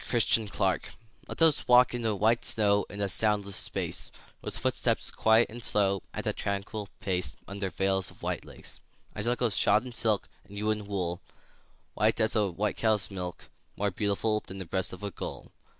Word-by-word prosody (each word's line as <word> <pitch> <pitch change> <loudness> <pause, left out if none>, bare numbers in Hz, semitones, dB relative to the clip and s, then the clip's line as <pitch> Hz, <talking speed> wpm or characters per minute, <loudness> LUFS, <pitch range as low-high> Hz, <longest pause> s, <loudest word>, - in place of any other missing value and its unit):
VELVET 120 -3 +2
SHOES 110 -3 +2 0.5
Let - - -6
us 160 -3 +4
walk 125 0 +6
in 120 - -2
the 110 -2 0
white 110 +4 +2
snow 100 -2 +3
In 100 - -6
a 100 - +1
soundless 100 0 +1
space; - - -2 0.3
With - - -2
footsteps - - 0
quiet 110 +1 +4
and 120 +1 -8
slow, 100 -3 +2
At - - -5
a - - +1
tranquil 100 +1 -3
pace, 90 -2 0
Under 100 -1 -3
veils 95 +1 0
of - - -16
white - - -2
lace. - - -9 0.4
I - - -3
shall 120 +3 +1
go 125 -1 +1
shod 105 +3 +3
in 125 - -7
silk, 110 -4 +1 0.2
And 100 +1 -12
you 105 +1 +1
in 105 -1 -3
wool, 90 -3 -2 0.7
White 110 +2 +2
as 110 0 +2
a 105 -3 +3
white 100 +4 -1
cow's 110 -3 +1
milk, 90 -2 -6 0.3
More 100 0 +1
beautiful 105 +3 +1
Than 95 -2 -9
the 95 - -5
breast 95 +2 0
of 95 +2 -9
a 100 - -3
gull. - - -7
105 Hz, 195 wpm, -29 LUFS, 95-110 Hz, 0.7 s, walk